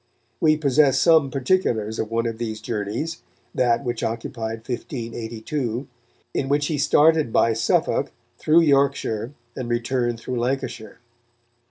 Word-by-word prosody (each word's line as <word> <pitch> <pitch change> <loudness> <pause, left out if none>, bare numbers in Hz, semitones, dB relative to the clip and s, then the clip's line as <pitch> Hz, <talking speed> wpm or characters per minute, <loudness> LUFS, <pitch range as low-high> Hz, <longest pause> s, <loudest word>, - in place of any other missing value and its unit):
We 155 -1 +4
possess 140 -2 +3
some 160 -3 +5
particulars 125 - 0
of 110 - -2
one 115 +1 0
of 115 -1 -3
these 110 -2 -3
journeys, 115 +9 -4 0.3
that 120 0 +2
which 120 -3 -3
occupied 115 0 -4
1582, 120 +1 -4 0.5
in 135 - -1
which 145 +1 +2
he 150 -1 -1
started 155 -1 +4
by 115 - +3
Suffolk, 110 0 +1 0.3
through 160 +2 +5
Yorkshire, 140 -5 +1 0.2
and 125 -2 -5
returned 120 0 -1
through 125 +1 -4
Lancashire. 125 -3 -3
120 Hz, 130 wpm, -23 LUFS, 115-140 Hz, 0.5 s, some